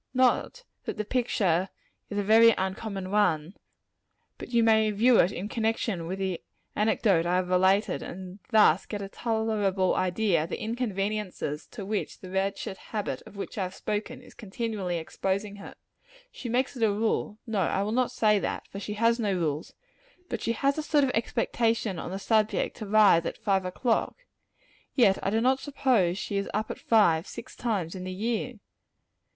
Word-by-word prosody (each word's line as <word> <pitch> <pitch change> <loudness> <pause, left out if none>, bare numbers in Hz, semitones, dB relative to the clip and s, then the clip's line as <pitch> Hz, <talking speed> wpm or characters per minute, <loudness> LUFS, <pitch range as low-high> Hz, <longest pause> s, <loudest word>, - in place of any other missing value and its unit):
Not 255 - +2 0.2
that - - -4
the 215 - -2
picture 195 -7 +1 0.4
is 205 - -4
a 205 - +1
very 225 +2 +6
uncommon 190 0 -3
one, 180 -5 +1 0.9
but - - -7
that 245 - -6
you 235 - +5
may 220 -1 +4
view 230 +4 +4
it 180 - +4
in 200 0 -5
connection 220 -6 -1
with 185 +3 -3
the 190 -3 -2 0.3
anecdote 205 -5 +2
I 175 - +2
have 180 0 0
related, 190 +3 +3
and 185 +2 -8
thus 210 -7 +4
get 205 -2 -4
a 195 - -6
tolerable 215 -5 0
idea 185 -2 +1
of - - -11
the - - -4
inconveniences 210 - -3
to 205 -5 -8
which 210 +1 -3
the 185 - -11
wretched 195 0 -2
habit 205 - -4
of - - -14
which 200 +1 -6
I - - 0
have 185 0 -3
spoken, 220 +5 -4
is - - -15
continually 205 -4 -3
exposing 195 +5 -3
her. 200 - -10 0.6
She 245 - -7
makes 255 +4 0
it 245 - -7
a 220 -2 +4
rule 210 0 -1
no, 220 -4 -2
I 190 +2 +1
will 210 - -2
not 250 +2 +1
say 215 -4 +3
that, - - -3
for 195 - -7
she 210 +1 -5
has 230 +2 +2
no 210 -3 0
rules, 155 -3 -2 0.5
but 235 - -3
she 230 - 0
has 275 +5 +1
a - - 0
sort 300 -1 +2
of 265 - +2
expectation 225 -3 0
on - - -5
the 190 - -4
subject 215 +1 +1
to 215 - -6
rise 205 -5 +5
at - - -5
five 195 -2 0
o'clock. 225 +6 0 0.8
Yet 205 -7 +4
I - - 0
do 220 +2 +1
not 260 +2 +3
suppose 245 - +1
she 200 - -3
is 200 - -2
up 215 +1 -1
at - - -7
five, 175 -7 +3
six 235 - -9
times 200 -9 -2
in 185 -1 -6
the 185 - -4
year. 225 +5 -2
210 Hz, 190 wpm, -27 LUFS, 190-225 Hz, 0.9 s, very